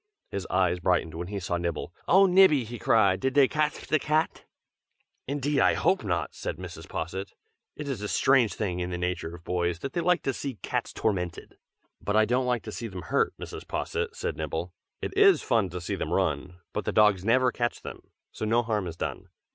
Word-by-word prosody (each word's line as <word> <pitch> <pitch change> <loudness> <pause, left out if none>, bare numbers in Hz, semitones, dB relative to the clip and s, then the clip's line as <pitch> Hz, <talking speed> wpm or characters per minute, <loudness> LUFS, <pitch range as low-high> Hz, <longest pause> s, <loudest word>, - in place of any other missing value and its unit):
His 100 -2 -4
eyes 90 -1 +2
brightened 90 -2 +1
when 85 +2 -5
he 100 +1 -4
saw 85 -1 -2
Nibble. 85 0 -3
"Oh! 190 +3 +6
Nibby!" 180 -7 +6
he 115 +1 -7
cried. 100 -4 +3
"Did 135 0 -1
dey 140 -2 +7
catf 150 +1 -1
de 155 - +2
cat?" 155 +2 0 0.8
"Indeed, 145 +1 0
I - - +4
hope 190 - +2
not!" 85 -5 -1
said - - -5
Mrs. 85 -2 -9
Posset. 95 +4 -4 0.4
"It 150 - -6
is 130 -7 -3
a 105 - -3
strange 125 -1 +3
thing 90 -4 -2
in 90 0 -2
the 90 - -3
nature 90 -1 -3
of 85 - -14
boys, 90 -1 -1
that 135 +10 -6
they 170 - 0
like 180 +1 +2
to 135 - 0
see 135 0 -4
cats - - -2
tormented." 90 -5 -2 0.5
"But 105 - -1
I 110 0 +5
don't 125 +2 +1
like 120 -2 0
to 110 - -7
see 115 - -5
them 95 -4 -7
hurt, 140 - +1
Mrs. - - -8
Posset!" 460 0 -3
said - - -3
Nibble. - - -3 0.3
"It - - -4
is 400 -1 +6
fun 110 -5 +2
to 90 +1 -5
see 90 - -4
them - - -3
run, 90 - 0 0.2
but - - -3
the - - 0
dogs 105 -4 +4
never 125 +4 +3
catch 120 0 -2
them, - - -8 0.3
so - - -7
no 115 +2 +2
harm 105 -5 -1
is 85 -1 -7
done. - - -4
110 Hz, 215 wpm, -27 LUFS, 90-135 Hz, 0.8 s, dey